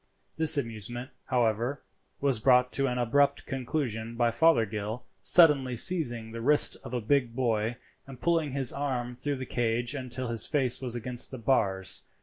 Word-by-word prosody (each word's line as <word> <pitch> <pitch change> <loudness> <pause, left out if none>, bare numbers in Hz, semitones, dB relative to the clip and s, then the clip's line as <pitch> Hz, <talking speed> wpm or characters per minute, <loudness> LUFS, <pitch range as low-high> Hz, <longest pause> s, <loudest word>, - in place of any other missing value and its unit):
This 160 -1 +6
amusement, 120 0 -5
however, 120 +2 -1 0.4
was 135 -5 +1
brought 125 +1 +3
to 135 0 -1
an 125 -1 -3
abrupt 140 +4 +1
conclusion 125 -4 -4
by 120 0 +1
Fothergill 115 -6 0 0.2
suddenly 145 -7 +5
seizing 120 -6 +1
the 115 0 -7
wrist 145 +5 +4
of - - -7
a 120 - -2
big 120 0 0
boy 115 -2 -1 0.3
and 135 -2 -12
pulling 165 -4 0
his 135 -3 +4
arm 130 -4 -3
through 140 +3 -4
the 130 - -6
cage 120 0 -2
until 130 -2 -5
his 115 -1 -2
face 135 -5 +1
was 125 -2 -4
against 120 +1 -2
the 130 - -8
bars. 100 -6 0
125 Hz, 160 wpm, -27 LUFS, 115-140 Hz, 0.4 s, This